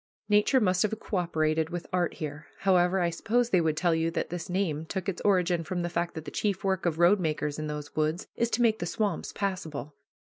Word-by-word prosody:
Nature 210 Hz, +6 st, +4 dB
must 185 Hz, -5 st, +2 dB
have 215 Hz, -, +3 dB
coöperated 160 Hz, -6 st, 0 dB
with 175 Hz, 0 st, -5 dB
art 180 Hz, -2 st, +1 dB
here. 150 Hz, -1 st, -6 dB
However, 185 Hz, -1 st, +3 dB
I 170 Hz, -1 st, +1 dB
suppose 235 Hz, +7 st, 0 dB
they 180 Hz, -, +4 dB
would 160 Hz, -2 st, 0 dB
tell 175 Hz, -1 st, +2 dB
you 165 Hz, 0 st, +1 dB
that 165 Hz, -, -3 dB
this 175 Hz, -1 st, -5 dB
name 175 Hz, -5 st, -1 dB
took 190 Hz, +1 st, -4 dB
its 190 Hz, -3 st, -2 dB
origin 180 Hz, -4 st, +2 dB
from 175 Hz, +2 st, -3 dB
the 175 Hz, -, -1 dB
fact 175 Hz, 0 st, -2 dB
that 160 Hz, -1 st, -6 dB
the -, -, -6 dB
chief 205 Hz, -1 st, -1 dB
work 190 Hz, -2 st, 0 dB
of 160 Hz, -2 st, 0 dB
roadmakers 160 Hz, -5 st, +2 dB
in 155 Hz, -, -3 dB
those 150 Hz, -1 st, -6 dB
woods 155 Hz, +3 st, 0 dB
is 235 Hz, -, +1 dB
to 240 Hz, +1 st, +1 dB
make 220 Hz, -2 st, +3 dB
the -, -, -2 dB
swamps 210 Hz, -2 st, -1 dB
passable. 160 Hz, -7 st, -4 dB
175 Hz, 220 wpm, -28 LUFS, 160-195 Hz, -, Nature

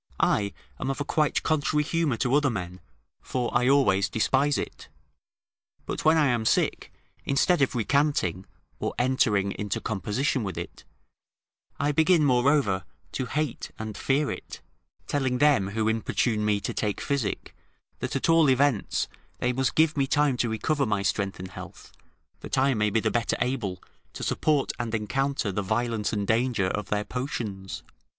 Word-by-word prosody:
I 100 Hz, -1 st, +2 dB, 0.3 s
am 130 Hz, -, -2 dB
of 135 Hz, -, -2 dB
a 145 Hz, -, -2 dB
quite 150 Hz, -1 st, +1 dB
contrary 150 Hz, -1 st, +1 dB
humour 155 Hz, -5 st, 0 dB
to 125 Hz, +2 st, 0 dB
other 145 Hz, 0 st, +4 dB
men, 90 Hz, -5 st, -5 dB, 0.4 s
for 125 Hz, -2 st, -3 dB
I 125 Hz, +1 st, +3 dB
always 100 Hz, -9 st, +3 dB
despise 135 Hz, +5 st, +2 dB
it; -, -, -6 dB, 1.0 s
but -, -, -4 dB
when 160 Hz, +1 st, +5 dB
I 155 Hz, -, +4 dB
am 120 Hz, -4 st, +1 dB
sick, -, -, +1 dB, 0.3 s
instead 140 Hz, +5 st, +2 dB
of 135 Hz, -, +2 dB
recanting, 120 Hz, -, +1 dB, 0.3 s
or -, -, -3 dB
entering 115 Hz, -6 st, +2 dB
into 105 Hz, -1 st, -2 dB
composition 110 Hz, +5 st, -1 dB
with 95 Hz, -4 st, -4 dB
it, -, -, -7 dB, 0.9 s
I 145 Hz, +1 st, +2 dB
begin, 160 Hz, +1 st, +4 dB
moreover, 125 Hz, -, +3 dB, 0.3 s
to 130 Hz, -, -3 dB
hate 150 Hz, 0 st, -2 dB
and 110 Hz, -1 st, -6 dB
fear 140 Hz, +2 st, +1 dB
it, -, -, -8 dB, 0.5 s
telling 130 Hz, -3 st, 0 dB
them 135 Hz, -8 st, +4 dB
who 110 Hz, +2 st, -1 dB
importune 110 Hz, 0 st, 0 dB
me 105 Hz, -1 st, +2 dB
to -, -, -3 dB
take 105 Hz, -2 st, -2 dB
physic, 140 Hz, -8 st, -2 dB, 0.4 s
that -, -, -3 dB
at -, -, 0 dB
all 165 Hz, -3 st, +5 dB
events 130 Hz, -4 st, +2 dB, 0.3 s
they 125 Hz, 0 st, 0 dB
must 130 Hz, 0 st, 0 dB
give 160 Hz, 0 st, +3 dB
me 140 Hz, -2 st, +1 dB
time 145 Hz, -1 st, +2 dB
to 120 Hz, -, 0 dB
recover 135 Hz, +6 st, 0 dB
my 105 Hz, -2 st, 0 dB
strength 100 Hz, -1 st, -1 dB
and 95 Hz, 0 st, -8 dB
health, -, -, -10 dB, 0.5 s
that -, -, -4 dB
I 135 Hz, +1 st, +3 dB
may 105 Hz, -2 st, +1 dB
be 110 Hz, +2 st, +1 dB
the 110 Hz, -, 0 dB
better 120 Hz, -2 st, 0 dB
able 120 Hz, -8 st, -2 dB, 0.3 s
to -, -, -6 dB
support 150 Hz, -3 st, +1 dB
and 115 Hz, -2 st, -2 dB
encounter 125 Hz, +1 st, -1 dB
the 105 Hz, -, -1 dB
violence 110 Hz, +1 st, -1 dB
and 105 Hz, -2 st, -1 dB
danger 115 Hz, -3 st, +1 dB
of 105 Hz, -1 st, -3 dB
their 105 Hz, 0 st, 0 dB
potions. 110 Hz, -7 st, -5 dB
125 Hz, 165 wpm, -26 LUFS, 105-140 Hz, 1.0 s, when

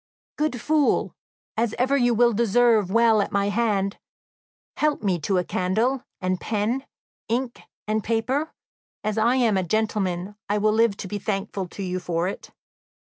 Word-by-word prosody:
"Good 300 Hz, -5 st, -1 dB
fool, 300 Hz, +3 st, +1 dB, 0.4 s
as 225 Hz, 0 st, 0 dB
ever 260 Hz, +3 st, +2 dB
you 245 Hz, -3 st, +3 dB
will 240 Hz, +1 st, +4 dB
deserve 225 Hz, -2 st, +3 dB
well 225 Hz, 0 st, +4 dB
at -, -, -3 dB
my 200 Hz, 0 st, +1 dB
hand, 205 Hz, -3 st, 0 dB, 0.8 s
help 300 Hz, -4 st, +1 dB
me 185 Hz, -4 st, +1 dB
to 185 Hz, +5 st, 0 dB
a 180 Hz, -, +2 dB
candle, 225 Hz, +10 st, 0 dB, 0.2 s
and 185 Hz, 0 st, -1 dB
pen, 230 Hz, +5 st, -1 dB, 0.4 s
ink, 240 Hz, +1 st, -2 dB, 0.3 s
and 215 Hz, 0 st, 0 dB
paper; 255 Hz, +7 st, 0 dB, 0.5 s
as 215 Hz, +1 st, -1 dB
I 235 Hz, +3 st, +3 dB
am 235 Hz, -6 st, +3 dB
a 190 Hz, -, +1 dB
gentleman, 205 Hz, -1 st, -1 dB
I 205 Hz, -, +2 dB
will 215 Hz, +1 st, +2 dB
live 220 Hz, -2 st, +3 dB
to 195 Hz, -, -6 dB
be 205 Hz, +2 st, -4 dB
thankful 195 Hz, -2 st, -3 dB
to 195 Hz, -, -7 dB
you 185 Hz, 0 st, -2 dB
for 175 Hz, -1 st, -1 dB
it!" 195 Hz, -, -6 dB
215 Hz, 165 wpm, -24 LUFS, 195-240 Hz, 0.8 s, will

